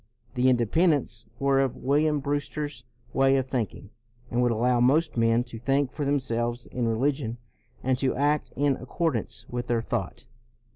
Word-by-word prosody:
The 125 Hz, +1 st, +3 dB
Independents 125 Hz, -, +2 dB
were 135 Hz, 0 st, +2 dB
of 135 Hz, -3 st, 0 dB
William 150 Hz, +2 st, +1 dB
Brewster's 145 Hz, -2 st, -3 dB, 0.3 s
way 135 Hz, 0 st, +4 dB
of 130 Hz, -, 0 dB
thinking, 115 Hz, -5 st, -3 dB, 0.4 s
and 120 Hz, -, +1 dB
would 120 Hz, -1 st, +3 dB
allow 120 Hz, +2 st, +2 dB
most 145 Hz, +7 st, +3 dB
men 115 Hz, 0 st, +3 dB
to 120 Hz, -2 st, -9 dB
think 135 Hz, +2 st, +1 dB
for 150 Hz, -, -3 dB
themselves 120 Hz, -4 st, -1 dB
in 120 Hz, -2 st, -2 dB
religion 120 Hz, 0 st, 0 dB, 0.5 s
and 130 Hz, 0 st, +2 dB
to 135 Hz, -1 st, +1 dB
act 145 Hz, +2 st, +1 dB
in 140 Hz, -1 st, +2 dB
ac -, -, -9 dB
cordance 120 Hz, -, -1 dB
with 120 Hz, 0 st, -4 dB
their 115 Hz, -1 st, 0 dB
thought. 115 Hz, -6 st, -4 dB
130 Hz, 160 wpm, -26 LUFS, 120-145 Hz, 0.5 s, way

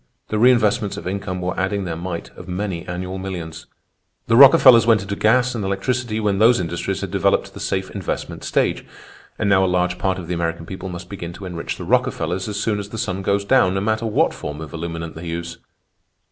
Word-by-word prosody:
The 105 Hz, -, -1 dB
reinvestments 110 Hz, -4 st, +3 dB
of -, -, -7 dB
income 95 Hz, -1 st, -3 dB
were 90 Hz, 0 st, -2 dB
adding 100 Hz, +1 st, -1 dB
their 85 Hz, -3 st, -4 dB
mite 85 Hz, 0 st, -5 dB
of 90 Hz, -, -11 dB
many 90 Hz, -1 st, -4 dB
annual 90 Hz, +1 st, -4 dB
millions. 85 Hz, -4 st, -6 dB, 0.6 s
"The 115 Hz, -, +2 dB
Rockefellers 130 Hz, -3 st, +8 dB
went 110 Hz, -4 st, +4 dB
into 100 Hz, +1 st, -4 dB
gas 125 Hz, +5 st, +3 dB
and 115 Hz, -4 st, -3 dB
electricity 110 Hz, +4 st, -1 dB
when 100 Hz, -2 st, 0 dB
those 115 Hz, +1 st, +5 dB
industries 85 Hz, -1 st, -3 dB
had -, -, -4 dB
developed -, -, +2 dB
to -, -, -24 dB
the -, -, -9 dB
safe 95 Hz, 0 st, -2 dB
investment 100 Hz, -2 st, -5 dB
stage. -, -, 0 dB, 0.5 s
And -, -, -1 dB
now 95 Hz, -1 st, +4 dB
a -, -, +2 dB
large 90 Hz, 0 st, 0 dB
part 95 Hz, -1 st, 0 dB
of 90 Hz, -, -6 dB
the 90 Hz, -, -2 dB
American 85 Hz, -1 st, -2 dB
people 95 Hz, +2 st, -7 dB
must 90 Hz, 0 st, -7 dB
begin 85 Hz, -3 st, -7 dB
to 95 Hz, -, -9 dB
enrich 85 Hz, -2 st, -5 dB
the -, -, -7 dB
Rockefellers 90 Hz, +5 st, 0 dB
as 105 Hz, -1 st, -3 dB
soon 105 Hz, -1 st, 0 dB
as 100 Hz, 0 st, -6 dB
the 110 Hz, -, -7 dB
sun 95 Hz, -4 st, -2 dB
goes 100 Hz, +1 st, 0 dB
down, 100 Hz, -6 st, +3 dB
no 95 Hz, -, 0 dB
matter 110 Hz, +2 st, 0 dB
what 110 Hz, -, +2 dB
form 75 Hz, +1 st, -6 dB
of 80 Hz, -3 st, -8 dB
illuminant 85 Hz, 0 st, -5 dB
they 85 Hz, +2 st, -8 dB
use. 85 Hz, 0 st, -5 dB
95 Hz, 215 wpm, -21 LUFS, 85-105 Hz, 0.6 s, Rockefellers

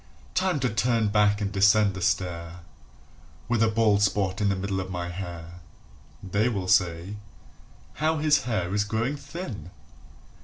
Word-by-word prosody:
Time 185 Hz, -4 st, +1 dB
to 130 Hz, -, +1 dB
turn 115 Hz, -1 st, +1 dB
back 105 Hz, 0 st, +3 dB
and 100 Hz, -1 st, -1 dB
descend 100 Hz, +1 st, +4 dB
the 95 Hz, -, -7 dB
stair, 85 Hz, -1 st, -2 dB, 0.9 s
With 120 Hz, -1 st, +1 dB
a 115 Hz, -, +5 dB
bald 110 Hz, -2 st, +2 dB
spot 100 Hz, -1 st, +1 dB
in 100 Hz, -, +2 dB
the 100 Hz, -, +1 dB
middle 95 Hz, 0 st, -2 dB
of 95 Hz, 0 st, -5 dB
my 90 Hz, -1 st, -4 dB
hair 85 Hz, -1 st, -7 dB, 0.6 s
[They 100 Hz, +5 st, +1 dB
will 100 Hz, -6 st, -3 dB
say: 90 Hz, +1 st, +1 dB, 0.8 s
"How 160 Hz, +1 st, +2 dB
his 150 Hz, -3 st, +2 dB
hair 95 Hz, -7 st, -1 dB
is 105 Hz, 0 st, +2 dB
growing 110 Hz, +6 st, -1 dB
thin!" 145 Hz, -, -7 dB
100 Hz, 155 wpm, -26 LUFS, 95-115 Hz, 0.9 s, a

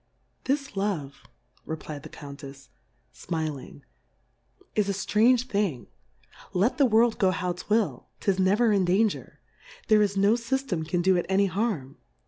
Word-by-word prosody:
This 275 Hz, +1 st, -1 dB
Love^ 185 Hz, -9 st, -3 dB, 0.4 s
reflfd 155 Hz, -2 st, -6 dB
the 155 Hz, -, -10 dB
Coun^efs^ 140 Hz, -2 st, -11 dB, 0.4 s
fmi 160 Hz, -2 st, -3 dB
ling, 125 Hz, -, -11 dB, 0.9 s
is 210 Hz, -2 st, +1 dB
a -, -, +1 dB
ftrange 225 Hz, +5 st, +3 dB
Thing; 200 Hz, -, -1 dB, 0.7 s
let 200 Hz, +11 st, +1 dB
the 275 Hz, -, +6 dB
World 230 Hz, 0 st, +3 dB
go 190 Hz, -, +4 dB
how 180 Hz, -1 st, -1 dB
'twill, 210 Hz, +4 st, -1 dB
'tis 195 Hz, -2 st, 0 dB
never 205 Hz, +5 st, +3 dB
in 195 Hz, -2 st, +3 dB
Danger; 195 Hz, +4 st, 0 dB, 0.5 s
there 215 Hz, -1 st, +6 dB
is 200 Hz, -1 st, +1 dB
no 200 Hz, +2 st, +4 dB
Syftem 235 Hz, -, -2 dB
can 175 Hz, +1 st, 0 dB
do 190 Hz, +1 st, +4 dB
it 175 Hz, -, -2 dB
any 195 Hz, +1 st, +3 dB
harm. 185 Hz, -, -2 dB
195 Hz, 145 wpm, -26 LUFS, 160-220 Hz, 0.9 s, the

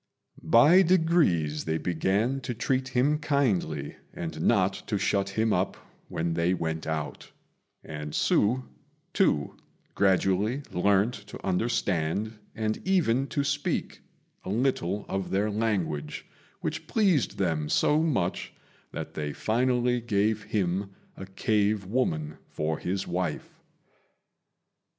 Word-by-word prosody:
By 150 Hz, +11 st, +6 dB
degrees 160 Hz, -, +2 dB
they 80 Hz, 0 st, 0 dB
began 100 Hz, +11 st, 0 dB
to 125 Hz, -2 st, -4 dB
treat 130 Hz, +3 st, 0 dB
him 135 Hz, +4 st, +2 dB
kindly, 105 Hz, -, 0 dB, 0.2 s
and -, -, -5 dB
not -, -, +3 dB
to -, -, 0 dB
shut 100 Hz, 0 st, 0 dB
him 110 Hz, +2 st, +1 dB
up -, -, 0 dB, 0.3 s
when 85 Hz, +1 st, -2 dB
they 85 Hz, +2 st, +1 dB
went 80 Hz, -2 st, -3 dB
out; 80 Hz, -1 st, -4 dB, 0.5 s
and 75 Hz, -1 st, -6 dB
Hsü, 125 Hz, +5 st, +2 dB, 0.5 s
too, 75 Hz, -, +1 dB, 0.4 s
gradually 100 Hz, +6 st, +2 dB
learnt 100 Hz, +5 st, +2 dB
to -, -, -9 dB
understand, 100 Hz, 0 st, 0 dB, 0.2 s
and 110 Hz, -1 st, -2 dB
even 140 Hz, -9 st, +2 dB
to 140 Hz, -, -1 dB
speak, 140 Hz, +1 st, -2 dB, 0.4 s
a -, -, -6 dB
little 105 Hz, -4 st, 0 dB
of 95 Hz, -1 st, -3 dB
their 100 Hz, +2 st, +1 dB
language, 90 Hz, -9 st, -2 dB, 0.4 s
which -, -, -4 dB
pleased 190 Hz, -, +2 dB
them 80 Hz, -5 st, 0 dB
so 150 Hz, -, +3 dB
much 125 Hz, -, -1 dB, 0.4 s
that -, -, -6 dB
they 75 Hz, -1 st, -3 dB
finally 125 Hz, +1 st, +1 dB
gave 110 Hz, -1 st, +1 dB
him 95 Hz, 0 st, -1 dB, 0.2 s
a 95 Hz, -, -8 dB
cave 105 Hz, +1 st, 0 dB
woman 80 Hz, -9 st, -1 dB
for 80 Hz, 0 st, -2 dB
his 95 Hz, +2 st, -2 dB
wife. 90 Hz, -3 st, -3 dB
100 Hz, 120 wpm, -27 LUFS, 85-125 Hz, 0.5 s, By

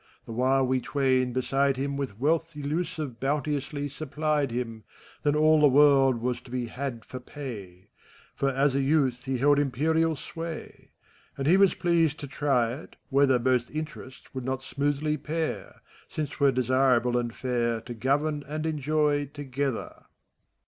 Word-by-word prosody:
The -, -, -9 dB
while 130 Hz, +3 st, +2 dB
we 130 Hz, 0 st, +1 dB
twain, 130 Hz, -3 st, +1 dB
beside 135 Hz, +2 st, +1 dB
him^ 140 Hz, +2 st, -2 dB
With 135 Hz, -7 st, -4 dB
wealth 165 Hz, +4 st, +1 dB
iUusive 150 Hz, -3 st, -3 dB
bounteously 145 Hz, +1 st, -1 dB
supplied 150 Hz, 0 st, -1 dB
him, 115 Hz, -2 st, -4 dB, 0.4 s
Then 145 Hz, 0 st, +1 dB
all 155 Hz, 0 st, +5 dB
the 150 Hz, -, +7 dB
world 135 Hz, -3 st, +5 dB
was 125 Hz, -1 st, -1 dB
to -, -, -16 dB
be 125 Hz, 0 st, -2 dB
had 125 Hz, -1 st, -5 dB
for 130 Hz, -, -7 dB
pay; 105 Hz, -9 st, -9 dB, 0.4 s
For 135 Hz, -, 0 dB
as 135 Hz, +1 st, +2 dB
a 135 Hz, -, +1 dB
jrouth 135 Hz, -3 st, +1 dB
he 130 Hz, -1 st, -1 dB
held 145 Hz, +3 st, +4 dB
imperial 160 Hz, +4 st, +1 dB
sway. 165 Hz, +2 st, -8 dB, 0.5 s
And 135 Hz, -, -3 dB
he 165 Hz, +6 st, +5 dB
was 195 Hz, -1 st, +5 dB
pleased 165 Hz, -4 st, +1 dB
to 145 Hz, -, -5 dB
try 130 Hz, -4 st, +1 dB
it, 140 Hz, -, -10 dB
whether 135 Hz, -2 st, +4 dB
Both 125 Hz, 0 st, +1 dB
interests 150 Hz, -4 st, -8 dB
would 130 Hz, -1 st, -4 dB
not 130 Hz, +1 st, -3 dB
smoothly 145 Hz, +2 st, -1 dB
pair. 155 Hz, +3 st, -4 dB, 0.3 s
Since 150 Hz, -2 st, -3 dB
't -, -, -10 dB
were 140 Hz, -1 st, +5 dB
desirable 125 Hz, -1 st, +2 dB
and 120 Hz, -1 st, 0 dB
fair 120 Hz, -2 st, -1 dB
To 120 Hz, -, -7 dB
govern 145 Hz, +5 st, 0 dB
and 155 Hz, +2 st, -4 dB
enjoy, 150 Hz, -1 st, +1 dB
together. 140 Hz, -3 st, -4 dB
140 Hz, 160 wpm, -27 LUFS, 125-150 Hz, 0.5 s, the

